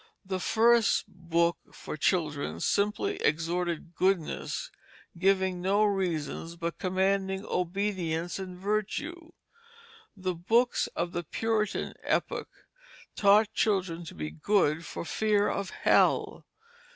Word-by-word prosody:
The 190 0 -2
first 230 +3 +3
books 170 0 0 0.2
for - - -6
children 150 -3 0
simply 205 +1 0
exhorted 170 +2 -1
goodness, 185 -4 -1 0.4
giving 190 0 +2
no 200 +3 +3
reasons, 170 -4 -1
but 170 0 -4
commanding 190 +1 0
obedience 180 -2 -2
and 185 -1 -7
virtue. 290 - -3 0.8
The 185 -1 -2
books 230 +9 +2
of 170 0 -1
the 175 - -3
Puritan 215 +4 -1
epoch - - -1 0.7
taught 210 +1 +4
children 185 -5 0
to - - -9
be 75 -1 -4
good 165 - +1
for 170 - -6
fear 210 +2 +2
of 200 -2 -2
hell. - - +2
185 Hz, 110 wpm, -29 LUFS, 170-205 Hz, 0.8 s, taught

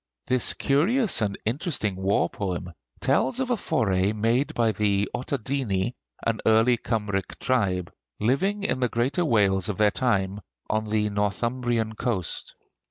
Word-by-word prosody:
This 130 -2 +1
curious 190 - +2
and 100 -2 0
interesting 115 - -1
war 95 -2 +1
poem 90 -4 -4 0.3
tells 250 - +1
of 260 -1 -1
a - - +4
foray 100 - +1
made 115 +6 +1
by 115 -2 +3
the 100 -1 +1
Ottadini, 125 -5 -1 0.3
an 115 -1 0
early 110 +3 +4
Kymric 105 -5 -2
tribe, 95 -9 0 0.3
living 190 - +1
in 165 - 0
the 125 -1 +1
greater 130 +11 0
Wales 100 - +2
of 105 - -2
their 105 -1 +4
time, 100 -5 0 0.3
on 110 0 0
the 105 0 0
Northumbrian 115 +3 -1
coast. 110 -5 -3
110 Hz, 140 wpm, -26 LUFS, 100-130 Hz, 0.3 s, a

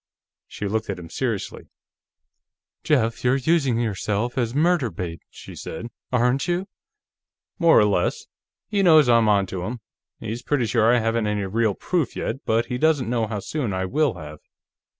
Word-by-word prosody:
She 105 - -5
looked 110 +1 -2
at 100 - -3
him 85 -2 -10
seriously. 115 -7 -3 1.2
"Jeff, 115 -7 +1
you're 125 +1 +3
using 135 -4 +1
yourself 110 +1 -2
as 120 -1 -1
murder 160 -4 +2
bait," 85 -6 -6
she - - -12
said. 115 +9 -7 0.2
"Aren't 125 +3 +1
you?" 175 +2 -1 0.9
"More 170 -1 +5
or 105 - +6
less. 100 -4 0 0.4
He 205 -2 0
knows 155 -7 +6
I'm 115 -2 +4
onto 95 -3 +1
him. 115 +7 -4 0.4
He's 115 +2 -5
pretty 130 -1 0
sure 115 +1 +3
I 125 - +4
haven't 115 -1 0
any 105 -1 -1
real 110 +1 0
proof, 170 -8 -1
yet, 135 - -4
but 115 +1 +2
he 125 -2 -4
doesn't 145 -6 +2
know 115 -2 0
how 105 -2 -4
soon 125 -3 -3
I 95 0 -1
will 145 +5 +1
have. 75 0 -9
115 Hz, 170 wpm, -23 LUFS, 105-135 Hz, 1.2 s, or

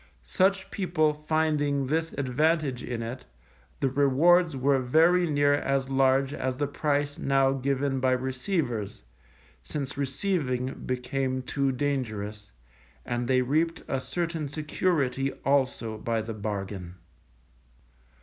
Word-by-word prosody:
Such 190 - +1
people 170 -6 +1
finding 150 -2 0
this 160 +4 -1
advantage 140 0 0
in 120 -2 -4
it, 120 +3 -6 0.6
the 135 - +3
rewards 145 +5 +4
were 135 +1 +3
very 165 +7 +4
near 145 -1 +3
as 135 -1 0
large 135 +1 +3
as 130 -2 -2
the 145 - 0
price 145 0 -1
now 135 -1 +3
given 135 0 0
by 130 0 +2
receivers 125 - -2 0.6
(since 140 - -5
receiving 135 -3 -1
became 130 +1 -2
too 135 +1 0
dangerous), 110 -7 -3 0.5
and 120 0 -2
they 130 0 +3
reaped 160 +6 0
a 135 - -1
certain 165 -2 -3
security 145 -3 0
also 130 -5 +1
by 115 -1 -1
the 115 +1 -5
bargain. 100 -4 -5
135 Hz, 120 wpm, -27 LUFS, 125-150 Hz, 0.6 s, rewards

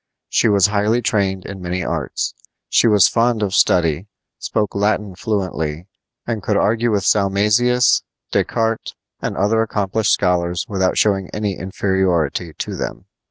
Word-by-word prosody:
She - - +2
was 100 -3 +4
highly 105 +3 +1
trained 95 -3 0
in 100 -1 -8
many 90 +1 -3
arts. - - -3 0.4
She - - +4
was 105 -4 +6
fond 115 -2 +1
of 95 -2 -2
study, 85 +1 +2 0.3
spoke 105 -2 -2
Latin 105 -1 0
fluently, 90 -6 -3 0.4
and 115 -3 -3
could 100 +2 0
argue 115 +3 +1
with 105 -3 0
Salmasius, 105 +5 +3 0.3
Descartes, 115 0 -1 0.3
and - - -3
other 110 +3 +2
accomplished 105 -1 0
scholars 90 -2 +1
without 95 -3 0
showing 95 -3 +1
any 105 -2 -2
inferiority 90 -4 -1
to - - -5
them. - - -5
100 Hz, 140 wpm, -19 LUFS, 95-110 Hz, 0.4 s, was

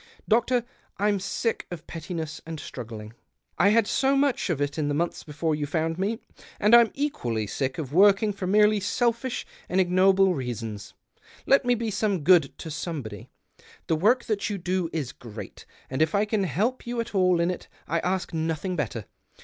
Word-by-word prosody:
Doctor, 240 +2 +2 0.3
I'm 205 0 +1
sick 225 +4 -2
of 170 -3 -8
pettiness 165 -1 -6
and 165 -1 -7
struggling; 110 -5 -8 0.5
I 200 - +6
had 225 +1 +4
so 270 +5 +2
much 275 -6 +1
of 165 -5 0
it 145 +2 -2
in 150 - 0
the 145 - 0
months 170 +3 -1
before 155 +1 -2
you 150 -1 -2
found 160 +2 -1
me, 210 +4 0 0.4
and 210 +2 +3
I'm 235 -2 +7
equally 120 - -1
sick 130 +6 -3
of 145 -4 -5
working 205 +3 +5
for 190 -2 -4
merely 210 +2 +4
selfish 235 +5 -1 0.2
and 185 - +1
ignoble 190 +1 +4
reasons. 115 -7 -5 0.5
Let 275 -1 +4
me 245 0 +3
be 225 -1 -2
some 200 -5 0
good 165 -4 +5
to 160 - -7
somebody. 140 - -5 0.6
The 165 - +1
work 220 +10 +3
that 210 -1 -1
you 205 - -2
do 180 -1 -1
is 145 -6 -3
great, 115 -7 -10 0.2
and 130 +3 -3
if 160 +4 +2
I 200 +1 +3
can 210 -2 0
help 215 - -1
you 240 0 -2
at 230 -1 -3
all 185 -3 +3
in 170 +1 +2
it 180 - -7 0.2
I 165 +2 0
ask 180 0 -2
nothing 160 +3 -2
better. 120 - -3
180 Hz, 185 wpm, -26 LUFS, 150-210 Hz, 0.6 s, I'm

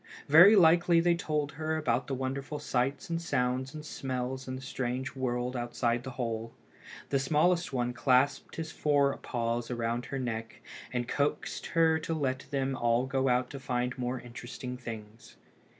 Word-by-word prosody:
Very 175 +9 +9
likely 170 -1 +6
they 170 +1 +4
told 150 -4 -1
her 160 +1 -2
about 130 -5 0
the 135 - -2
wonderful 135 +3 -3
sights 135 +1 -1
and 165 0 -1
sounds 130 -1 -1
and 155 0 -7
smells 130 -2 -4
in 130 - -3
the 130 - -7
strange 130 +1 -3
world 125 -1 -2
outside 120 0 -1
the 130 - -5
hole. 115 -2 -3 0.5
The 135 - +2
smallest 160 +5 +2
one 125 -2 -1
clasped 130 +3 +2
his 160 -1 -4
fore 145 -2 +2
paws 115 0 -2
around 120 0 -2
her 135 - -4
neck, 115 -3 -4 0.3
and 120 -1 -2
coaxed 145 +2 -1
her 160 -1 +5
to 160 +1 -3
let 130 -3 -2
them 135 -1 -1
all 120 0 +2
go 135 0 0
out 125 0 +1
to 140 - -6
find 125 -1 -1
more 125 0 -2
interesting 120 +1 -7
things. 115 -3 -9
130 Hz, 165 wpm, -30 LUFS, 125-145 Hz, 0.5 s, Very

